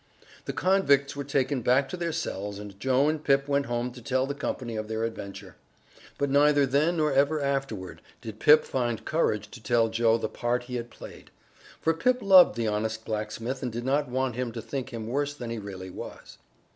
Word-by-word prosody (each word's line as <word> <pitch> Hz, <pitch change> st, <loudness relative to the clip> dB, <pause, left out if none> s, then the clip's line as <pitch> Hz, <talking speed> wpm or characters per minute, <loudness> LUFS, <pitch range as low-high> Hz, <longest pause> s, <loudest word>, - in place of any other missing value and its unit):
The -, -, -2 dB
convicts 145 Hz, -8 st, +2 dB
were 140 Hz, -, -4 dB
taken 140 Hz, -1 st, 0 dB
back 130 Hz, +4 st, +3 dB
to -, -, -4 dB
their 170 Hz, -2 st, -2 dB
cells 100 Hz, -8 st, -4 dB
and 100 Hz, -1 st, -10 dB
Joe 130 Hz, +4 st, +2 dB
and 155 Hz, 0 st, -1 dB
Pip 140 Hz, -1 st, +2 dB
went 140 Hz, -1 st, +1 dB
home 120 Hz, +1 st, -2 dB
to 125 Hz, 0 st, -12 dB
tell 130 Hz, +2 st, 0 dB
the 140 Hz, -, -3 dB
company 125 Hz, -4 st, -4 dB
of 110 Hz, 0 st, -4 dB
their 110 Hz, 0 st, -2 dB
adventure. 100 Hz, -4 st, -6 dB, 0.6 s
But 140 Hz, -1 st, -1 dB
neither 145 Hz, 0 st, +5 dB
then 150 Hz, +6 st, +1 dB
nor 150 Hz, -2 st, +1 dB
ever 145 Hz, +3 st, +3 dB
afterward 135 Hz, -9 st, -3 dB, 0.2 s
did 110 Hz, -1 st, -9 dB
Pip 150 Hz, +1 st, +6 dB
find 120 Hz, -3 st, -2 dB
courage 105 Hz, -10 st, 0 dB
to 125 Hz, -, -11 dB
tell 115 Hz, +1 st, +2 dB
Joe 115 Hz, 0 st, +3 dB
the -, -, -2 dB
part 120 Hz, +1 st, -2 dB
he 125 Hz, 0 st, -5 dB
had 120 Hz, 0 st, -6 dB
played; -, -, -12 dB, 0.5 s
for 165 Hz, -, +2 dB
Pip 250 Hz, +10 st, +1 dB
loved 185 Hz, -, +7 dB
the 115 Hz, -1 st, -1 dB
honest 110 Hz, +1 st, -2 dB
blacksmith 110 Hz, +4 st, -4 dB
and 125 Hz, -, -3 dB
did 120 Hz, +2 st, -5 dB
not 140 Hz, 0 st, +1 dB
want 130 Hz, 0 st, -1 dB
him 125 Hz, -1 st, -2 dB
to 115 Hz, -, -5 dB
think 135 Hz, -1 st, -5 dB
him 115 Hz, -2 st, -5 dB
worse 145 Hz, +5 st, -2 dB
than 120 Hz, -4 st, -6 dB
he 115 Hz, -, -3 dB
really 95 Hz, -2 st, -8 dB
was. -, -, -10 dB
125 Hz, 210 wpm, -27 LUFS, 110-140 Hz, 0.6 s, loved